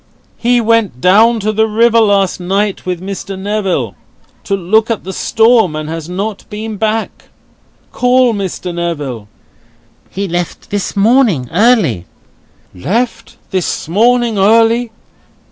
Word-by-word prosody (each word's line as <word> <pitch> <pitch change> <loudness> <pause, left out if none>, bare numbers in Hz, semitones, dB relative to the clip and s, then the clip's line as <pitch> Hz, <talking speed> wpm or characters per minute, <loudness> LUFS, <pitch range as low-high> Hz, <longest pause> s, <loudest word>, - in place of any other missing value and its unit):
He 245 +1 +2
went 225 - +1
down 220 - +4
to 215 +2 0
the 220 +1 +1
river 230 +2 +3
last 200 -4 +2
night, 195 +2 -2
with 180 -2 -2
Mr. 195 0 -6
Neville, 190 - -2 0.5
to 200 - 0
look 215 +5 +1
at 230 - -2
the 190 - -6
storm, 225 -7 +2
and 155 0 -5
has 165 0 -6
not 200 +3 -4
been 215 0 -6
back. 220 +1 -2 0.7
Call 250 -1 +2
Mr. 190 -3 -4
Neville!" 145 -10 -4 0.8
"He 200 +1 -4
left 175 -1 -4
this 205 0 -3
morning, 205 - +2
early." 180 - +2 0.7
"Left 225 - -3
this 185 -4 -2
morning 230 +4 +2
early? 230 +3 +3
205 Hz, 130 wpm, -14 LUFS, 180-225 Hz, 0.8 s, down